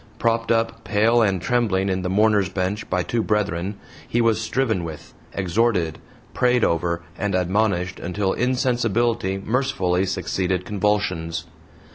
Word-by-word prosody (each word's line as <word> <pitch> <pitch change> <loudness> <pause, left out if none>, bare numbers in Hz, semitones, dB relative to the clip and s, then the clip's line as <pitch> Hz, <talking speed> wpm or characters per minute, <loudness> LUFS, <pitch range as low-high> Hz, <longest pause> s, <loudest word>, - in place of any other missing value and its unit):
Propped 115 -1 +1
up 115 0 0
pale 115 +3 +3
and 100 -4 +2
trembling 100 -2 +1
in 95 -1 0
the 90 - -2
"Mourners' 105 -1 +3
Bench" 95 +2 -2
by 90 0 +1
two 115 +4 -1
brethren, 100 -3 -1 0.3
he 120 - 0
was 115 -1 +2
"striven 110 -5 0
with," 80 -3 -8 0.2
exhorted, 95 -3 0 0.3
prayed 125 -1 +2
over, 85 +1 0 0.2
and 105 -2 0
admonished, 95 -1 0
until 95 +2 -1
insensibility 120 -4 +1
mercifully 100 -5 0
succeeded 95 0 -1
convulsions. 90 -6 -1
100 Hz, 130 wpm, -23 LUFS, 90-115 Hz, 0.3 s, pale